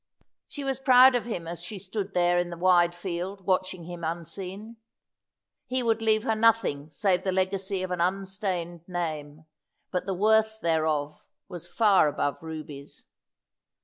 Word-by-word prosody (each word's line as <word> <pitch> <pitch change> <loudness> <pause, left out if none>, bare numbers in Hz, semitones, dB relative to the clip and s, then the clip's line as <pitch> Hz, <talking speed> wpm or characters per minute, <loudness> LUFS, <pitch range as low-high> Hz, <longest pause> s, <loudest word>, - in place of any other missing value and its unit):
She 290 - -7
was 270 -1 -2
proud 260 -1 +7
of 245 -2 0
him 175 -8 -5
as 170 0 -6
she 185 +4 -6
stood 195 +1 -5
there 175 0 +3
in 175 0 -1
the 170 - -7
wide 175 -1 +4
field 185 +2 -5
watching 185 -1 0
him 175 0 -8
unseen. 190 +7 -6 0.9
He 255 0 -1
would 225 -1 +1
leave 220 -1 +2
her 225 - +1
nothing 215 -10 +2
save 180 +3 +1
the 190 - -1
legacy 190 0 -1
of 185 - -4
an 180 -1 -1
unstained 185 -2 -2
name, 155 -4 -5 0.5
but 180 +1 -2
the 190 - -1
worth 220 +2 +2
thereof 155 -4 -1 0.2
was 175 -3 -8
far 205 -7 +4
above 145 -1 -2
rubies. 155 -3 -9
185 Hz, 155 wpm, -27 LUFS, 170-210 Hz, 0.9 s, proud